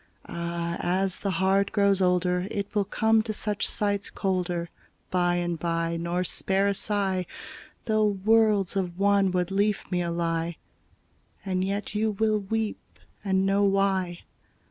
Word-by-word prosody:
Áh! 170 0 -3
ás 185 +1 0
the 200 - -2
heart 190 +2 +2
grows 200 -2 +3
older 180 0 +1
It 200 -2 -4
will 205 -2 +1
come 220 +2 +2
to 215 0 -4
such 210 -1 0
sights 205 -1 -1
colder 180 -3 -2 0.4
By 175 -1 +2
and 175 -1 -2
by, 165 0 -1
nor 170 +2 -1
spare 195 +2 +1
a 200 - +2
sigh 195 -3 0 0.6
Though 215 -1 +2
worlds 205 -1 +2
of 180 -3 -2
wanwood 195 -3 +2
leafmeal 195 -3 0
lie; 165 0 -1 0.9
And 185 -1 0
yet 200 +2 -3
you 215 0 0
wíll 215 -2 0
weep 225 -1 -3 0.3
and 190 -1 +1
know 195 +1 +2
why. 195 -3 +1
190 Hz, 140 wpm, -26 LUFS, 175-200 Hz, 0.9 s, grows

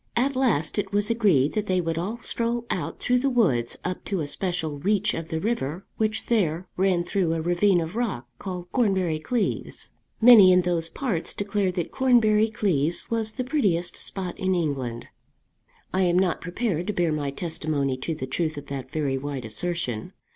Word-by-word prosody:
At 265 +3 +1
last 215 - +1
it 195 -2 -3
was 205 +2 +1
agreed 190 - +3
that 210 -1 -1
they 185 -1 +2
would 165 -2 -1
all 205 +7 -3
stroll 235 0 -2
out - - -3
through 250 0 +2
the 275 +2 +1
woods 165 - +1
up 180 0 -3
to 195 -5 -1
a 145 - -3
special 160 -3 -2
reach 205 +5 +1
of 165 -1 -4
the 160 - -2
river 185 - -2
which 215 0 0
there 180 -7 +1
ran 185 -2 +2
through 175 -2 0
a 165 - -1
ravine 175 +3 +3
of 165 +4 -4
rock, 205 - -2
called 180 -2 -6
Cornbury 190 -9 +1
Cleeves. 225 +8 -2 0.3
Many 220 -5 +9
in 180 0 +5
those 170 -2 0
parts 210 -10 -2
declared 200 -2 -1
that 175 - -2
Cornbury 225 -4 +4
Cleeves 175 -7 -1
was 220 -1 0
the 255 - -3
prettiest 205 - 0
spot 185 -3 -4
in 190 0 +1
England. 135 -8 -2 0.8
I 190 - +2
am 175 -1 +3
not 185 -2 +1
prepared 180 -1 -2
to 210 - -1
bear 175 -3 +1
my 150 -2 -1
testimony 155 -3 -2
to 155 +5 -3
the 140 - -4
truth 155 +3 -2
of 145 - -7
that 135 -2 -5
very 140 -3 -1
wide 140 -3 -5
assertion. 120 -1 -3
180 Hz, 185 wpm, -25 LUFS, 155-210 Hz, 0.8 s, Many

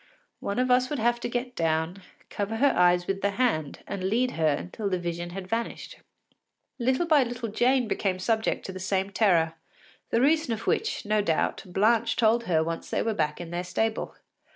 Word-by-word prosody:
One 200 - -3
of 255 0 +2
us 250 0 +3
would 295 - -2
have 240 +1 +1
to 240 - -3
get 245 +1 -3
down, 165 +3 -1 0.3
cover 205 +2 -2
her 280 +5 +3
eyes 175 0 +4
with 195 +1 -2
the 200 - +2
hand 155 - 0
and 195 -2 -4
lead 240 +6 +1
her 160 -1 +1
until 180 +8 -2
the 185 - 0
vision 175 0 -4
had 185 +1 -7
vanished. 230 +3 -4 0.8
Little 260 +7 +1
by 310 -4 +5
little 235 -2 -4
Jane 245 +3 +2
became 195 -3 -1
subject 220 +4 0
to - - -4
the 185 - -7
same 190 +1 -1
terror, 175 -7 +3 0.6
the 230 - +2
reason 300 -1 +3
of 220 - -9
which, 440 - 0
no 210 0 +2
doubt, 165 -6 0
Blanche 220 +5 +2
told 230 +1 +3
her 160 -3 +2
once 165 0 -4
they - - 0
were 225 - 0
back 150 -7 -1
in 170 -1 -7
their 175 +1 -2
stable. 220 +5 -2
205 Hz, 200 wpm, -27 LUFS, 180-240 Hz, 0.8 s, by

